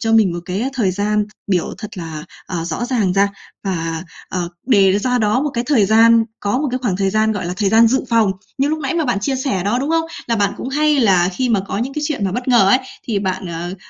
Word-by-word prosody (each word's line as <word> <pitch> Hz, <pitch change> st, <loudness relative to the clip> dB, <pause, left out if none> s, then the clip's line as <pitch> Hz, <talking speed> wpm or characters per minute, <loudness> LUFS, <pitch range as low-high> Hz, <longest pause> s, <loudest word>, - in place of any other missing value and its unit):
cho 225 Hz, 0 st, 0 dB
mình 215 Hz, -6 st, +4 dB
một 175 Hz, -, -4 dB
cái 190 Hz, +6 st, -2 dB
thời 210 Hz, -7 st, +1 dB
gian 210 Hz, +2 st, 0 dB, 0.2 s
biểu 185 Hz, -4 st, 0 dB
thật 210 Hz, -3 st, -8 dB
là, 160 Hz, -3 st, -6 dB, 0.2 s
à, 170 Hz, -3 st, -3 dB
rõ 170 Hz, +8 st, -3 dB
ràng 225 Hz, -8 st, 0 dB
ra 200 Hz, +1 st, +3 dB, 0.4 s
và, 165 Hz, -3 st, -2 dB, 0.3 s
à, 185 Hz, -, -3 dB, 0.3 s
đề 200 Hz, -5 st, +4 dB
ra 250 Hz, +3 st, 0 dB
đó 220 Hz, +5 st, +1 dB
một 295 Hz, -, -1 dB
cái 235 Hz, +1 st, -1 dB
thời 230 Hz, -10 st, +3 dB
gian 225 Hz, +1 st, +5 dB, 0.2 s
có 205 Hz, +5 st, 0 dB
một 290 Hz, -1 st, -1 dB
cái 255 Hz, -, -1 dB
khoảng 195 Hz, -7 st, 0 dB
thời 195 Hz, -1 st, 0 dB
gian, 220 Hz, +1 st, +2 dB
gọi 190 Hz, -4 st, -3 dB
là, 180 Hz, -, -3 dB
thời 200 Hz, -2 st, +1 dB
gian 225 Hz, +2 st, +6 dB
dự 265 Hz, +3 st, +1 dB
phòng. 225 Hz, -4 st, +3 dB, 0.3 s
Như 275 Hz, +2 st, +2 dB
lúc 310 Hz, +1 st, -1 dB
nãy 275 Hz, +1 st, -2 dB
mà 330 Hz, -2 st, +1 dB
bạn 240 Hz, -6 st, 0 dB
chia 265 Hz, +5 st, -1 dB
sẻ 255 Hz, -9 st, -1 dB
đó, 225 Hz, +5 st, +1 dB
đúng 280 Hz, +4 st, -2 dB
không? 325 Hz, 0 st, +2 dB, 0.2 s
Là 230 Hz, -1 st, 0 dB
bạn 200 Hz, -1 st, +1 dB
cũng 255 Hz, -, -5 dB
hay 300 Hz, +1 st, +2 dB
là 185 Hz, -6 st, +4 dB
khi 255 Hz, +6 st, -1 dB
mà 210 Hz, -4 st, +2 dB
có -, -, -2 dB
những 260 Hz, +4 st, -2 dB
cái 300 Hz, -, -3 dB
chuyện 275 Hz, -10 st, -2 dB
mà 190 Hz, -, -1 dB
bất 245 Hz, +3 st, -3 dB
ngờ 230 Hz, -6 st, +5 dB
ấy, 255 Hz, -, +5 dB, 0.3 s
thì 210 Hz, -3 st, +1 dB
bạn, 190 Hz, -1 st, -3 dB
ờ, 170 Hz, +2 st, -5 dB
215 Hz, 270 wpm, -18 LUFS, 190-250 Hz, 0.4 s, gian